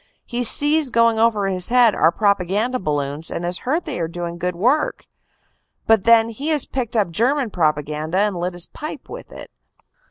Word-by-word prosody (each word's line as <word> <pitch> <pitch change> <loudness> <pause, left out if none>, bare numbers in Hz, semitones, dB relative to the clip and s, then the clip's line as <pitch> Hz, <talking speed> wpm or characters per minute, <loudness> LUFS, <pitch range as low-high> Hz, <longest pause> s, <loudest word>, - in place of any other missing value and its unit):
He 245 0 -3
sees 295 +4 +4
going 230 -1 +2
over 220 -3 +2
his 185 -2 +2
head 240 -3 +5
our 165 - +3
propaganda 205 +5 0
balloons 145 -1 -3
and 170 - -5
has 175 +1 -2
heard 310 +7 -2
they 295 - -5
are 165 - -1
doing 170 0 -6
good 180 0 -2
work; 255 - 0 0.8
but 220 -4 +3
then 230 0 +5
he 270 +7 -6
has 300 -4 +1
picked 250 -3 -4
up 205 -6 +1
German 245 - 0
propaganda, 155 0 -1
and 205 0 +1
lit 175 +1 -3
his 175 0 -6
pipe 305 - -8
with - - -10
it. - - -9
210 Hz, 185 wpm, -20 LUFS, 175-245 Hz, 0.8 s, head